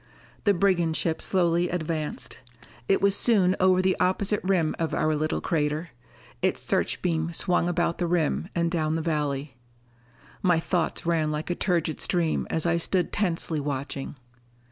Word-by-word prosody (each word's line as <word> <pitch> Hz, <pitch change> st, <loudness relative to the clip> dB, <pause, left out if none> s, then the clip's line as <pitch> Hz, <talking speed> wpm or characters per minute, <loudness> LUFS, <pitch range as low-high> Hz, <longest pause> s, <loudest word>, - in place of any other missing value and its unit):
The 205 Hz, -1 st, +4 dB
brigand 175 Hz, -4 st, +2 dB
ship 160 Hz, -2 st, -1 dB
slowly 175 Hz, -2 st, +1 dB
advanced. 160 Hz, -3 st, -4 dB, 0.5 s
It 195 Hz, -, +3 dB
was 200 Hz, 0 st, +4 dB
soon 195 Hz, -5 st, +4 dB
over 185 Hz, 0 st, +4 dB
the 185 Hz, 0 st, +2 dB
opposite 195 Hz, +3 st, +1 dB
rim 180 Hz, -4 st, +1 dB
of 165 Hz, -1 st, -1 dB
our 155 Hz, 0 st, +1 dB
little 155 Hz, +1 st, -1 dB
crater. 155 Hz, 0 st, -1 dB, 0.5 s
Its -, -, +1 dB
searchbeam 165 Hz, -2 st, 0 dB
swung 175 Hz, 0 st, +1 dB
about 175 Hz, -1 st, 0 dB
the 175 Hz, -, 0 dB
rim 170 Hz, 0 st, 0 dB
and 170 Hz, -1 st, +1 dB
down 160 Hz, -2 st, 0 dB
the 165 Hz, -, -2 dB
valley. 145 Hz, -4 st, -2 dB, 0.8 s
My 175 Hz, -3 st, +3 dB
thoughts 170 Hz, 0 st, -1 dB
ran 160 Hz, -2 st, +1 dB
like 155 Hz, +3 st, -3 dB
a -, -, 0 dB
turgid 170 Hz, -5 st, -1 dB
stream 170 Hz, -3 st, 0 dB
as 160 Hz, -, 0 dB
I 170 Hz, 0 st, +2 dB
stood 180 Hz, +2 st, 0 dB
tensely 170 Hz, -5 st, 0 dB
watching. 140 Hz, -1 st, -4 dB
170 Hz, 155 wpm, -26 LUFS, 155-180 Hz, 0.8 s, The